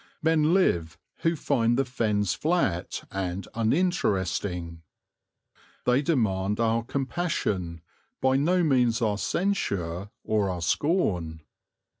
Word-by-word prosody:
Men 160 -1 +3
live 85 - +1 0.2
who 165 0 +1
find 120 -6 +1
the 135 - +2
Fens 105 -6 0
flat 155 - -1
and 95 -1 -3
uninteresting. 100 - 0 1.0
They 125 +2 +3
demand 105 - 0
our 115 0 +2
compassion, 120 - -2 0.4
by 130 0 +3
no 175 +6 +2
means 125 -6 +3
our 105 -2 0
censure 100 - -1
or 105 -3 +1
our 90 -2 -3
scorn. 90 - 0
115 Hz, 105 wpm, -27 LUFS, 95-145 Hz, 1.0 s, Men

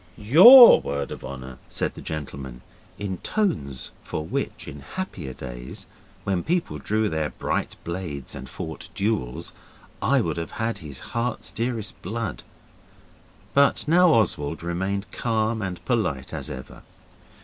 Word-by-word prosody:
'YOUR 190 - +10
word 70 -1 -3
of - - -7
honour,' 65 -1 -8
said - - -2
the - - -10
gentleman, 65 -5 -6 0.4
in 95 -3 -4
tones 110 - -2
for 75 - -4
which, - - -4
in 75 - -8
happier 130 - -6
days, 60 -1 -8 0.4
when 95 -3 0
people 175 - -1
drew 110 +1 0
their 80 -4 -1
bright - - -2
blades 85 -5 -5
and - - -8
fought - - -7
duels, 100 - -2 0.5
I 135 +6 +3
would 85 -9 -1
have 85 -1 -5
had 115 +1 -1
his 70 -5 -8
heart's 115 0 -2
dearest 115 -3 -3
blood. 105 -2 -4 1.1
But 140 +2 +3
now 175 +2 +6
Oswald 80 - +1
remained 95 +4 -2
calm 110 -1 0
and 95 -3 -5
polite 95 - -1
as - - -4
ever. 65 0 -9
95 Hz, 140 wpm, -25 LUFS, 70-115 Hz, 1.1 s, YOUR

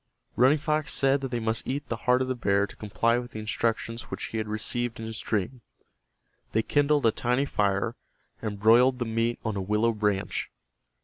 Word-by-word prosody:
Running 130 +5 +5
Fox 155 0 -1
said 135 0 +3
that 135 - -3
they 120 -1 -2
must 110 0 -2
eat 140 +3 -3
the 115 - -2
heart 125 +1 +5
of - - -4
the 130 - 0
bear 100 -5 +1
to - - -13
comply 115 +3 +1
with 120 -1 -9
the 110 - -5
instructions 115 +2 -2
which - - -5
he 115 - -3
had 110 - -3
received 115 +2 -2
in 110 - -5
his 110 -1 -3
dream. 115 +4 -2 0.9
They 110 - +2
kindled 145 0 +2
a 115 - +5
tiny 125 +5 0
fire, 100 -1 0 0.5
and 105 -3 -4
broiled 120 +5 +5
the 120 - -2
meat 115 +1 0
on 110 -2 -1
a 100 - -2
willow 105 +4 +1
branch. 105 -2 -1
115 Hz, 200 wpm, -27 LUFS, 110-125 Hz, 0.9 s, Running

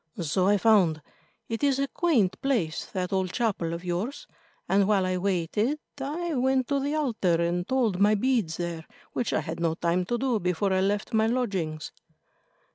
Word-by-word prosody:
"So 180 +3 +1
I 205 +1 +4
found. 185 -8 +3 0.4
It 225 +4 -4
is 275 -2 +3
a 275 0 0
quaint 235 - +1
place, 230 - 0
that 185 0 -3
old 190 -2 0
chapel 200 -8 -1
of 170 +2 -5
yours, 185 +10 -3 0.4
and 195 0 +3
while 200 -3 +3
I 185 0 0
waited 200 - 0 0.2
I 320 +5 -3
went 260 -1 +1
to 280 -1 +1
the 285 +2 -1
altar 225 - +1
and 170 +1 0
told 235 -8 +1
my 210 +2 +5
beads 215 -7 0
there, 170 -2 -4 0.3
which 240 - -1
I - - +1
had 160 +2 -6
no 165 -1 0
time 175 +1 0
to 240 - -1
do 250 -3 0
before 180 +2 0
I 185 - +2
left 205 +4 -1
my 220 0 +3
lodgings." 190 -11 -2
200 Hz, 185 wpm, -27 LUFS, 175-250 Hz, 0.4 s, my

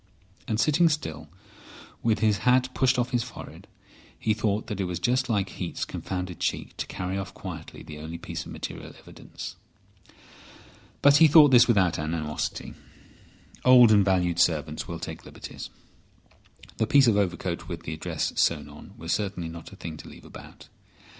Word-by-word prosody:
And 110 -1 -1
sitting 155 +7 +4
still, 80 - -4 0.7
with 110 -3 +1
his 105 -3 +3
hat 125 +2 +3
pushed 130 0 +2
off 125 0 0
his 120 - +1
forehead, 115 -2 -10 0.5
he 110 - +1
thought 105 0 -1
that 105 - -5
it - - 0
was 90 -1 -3
just 125 +7 0
like 100 -4 0
Heat's 90 -2 -4
confounded 90 -2 -5
cheek - - -2
to - - -4
carry 90 +1 -3
off 95 -1 -7
quietly 85 -5 -8
the 75 -1 -9
only 80 +2 -6
piece 85 - -6
of - - -11
material - - -7
evidence. - - -10 1.5
But 140 0 +7
he 160 +1 +8
thought 150 -1 +7
this 120 -1 +7
without 95 -9 +3
animosity. 75 -1 -3 0.9
Old 125 -3 +8
and 105 -2 +6
valued 90 -3 +1
servants 80 -5 +1
will - - -5
take - - -7
liberties. - - -9 1.1
The 110 - +1
piece 140 +1 +6
of 115 -4 +4
overcoat 90 -3 -1
with 85 -2 -6
the 80 - -5
address 80 - -3
sewn - - +1
on - - -13
was 85 +1 -2
certainly 95 -5 -2
not 85 0 -10
a - - -11
thing 80 -2 -7
to - - -11
leave - - -14
about. - - -13
100 Hz, 170 wpm, -26 LUFS, 85-120 Hz, 1.5 s, he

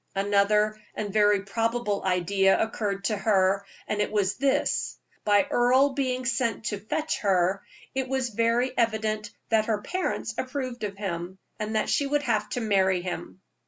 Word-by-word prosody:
Another 210 +2 +2
and 205 -2 -4
very 205 -2 +4
probable 225 0 -1
idea 195 +1 +2
occurred 205 -3 -2
to 210 +2 +1
her. 195 -1 +2 0.2
It 210 0 -1
was 205 -2 +1
this: 275 0 0 0.3
by 205 -1 +5
Earle 260 +3 +3
being 255 -2 -1
sent 235 -3 0
to 210 -1 -2
fetch 305 +10 -2
her, 190 -1 +2 0.3
it 265 -1 -1
was 260 -1 -1
very 235 +3 +1
evident 220 -2 0 0.2
that 220 -1 +2
her 210 -2 -1
parents 340 -10 -2
approved 255 -3 -4
of 200 -1 -4
him, 185 -2 -4 0.2
and 215 +1 -3
that 215 - +1
she 285 - +1
would 290 +1 0
have 215 -5 0
to 245 - -2
marry 190 -4 +2
him. 180 +1 -6
215 Hz, 160 wpm, -26 LUFS, 200-245 Hz, 0.3 s, by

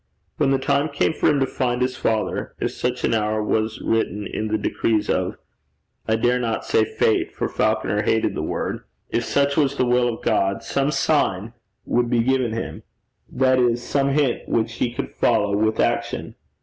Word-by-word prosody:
When 145 - +2
the 135 - +3
time 140 +3 +1
came 145 +2 +1
for - - +2
him 145 -2 +2
to - - +4
find 125 -2 -1
his 125 0 0
father, 110 -1 -1
if - - -1
such 125 0 -3
an - - +2
hour 110 -1 0
was 110 +1 -1
written 105 -2 -1
in 110 +2 -3
the 110 0 0
decrees 110 0 0
of - - -1 0.7
I 110 - +2
dare 120 +2 +2
not 115 -2 -2
say 110 - +3
Fate, 110 - +1
for - - -1
Falconer 105 +2 0
hated 110 +1 +1
the - - -3
word - - -3 0.3
if - - 0
such 140 0 +1
was 140 -2 +2
the 130 - +1
will 125 0 +2
of - - -15
God, 95 0 +1
some 140 +1 0
sign 130 -8 0 0.3
would 120 0 +1
be 120 -1 +2
given 130 -2 +1
him 115 - -5 0.5
that 130 -1 +3
is, 120 -1 +2
some 140 +1 +1
hint 140 -3 0
which 115 0 0
he 120 - 0
could 120 - -5
follow 100 0 +2
with 110 +1 +1
action. - - -1
120 Hz, 190 wpm, -22 LUFS, 110-135 Hz, 0.7 s, to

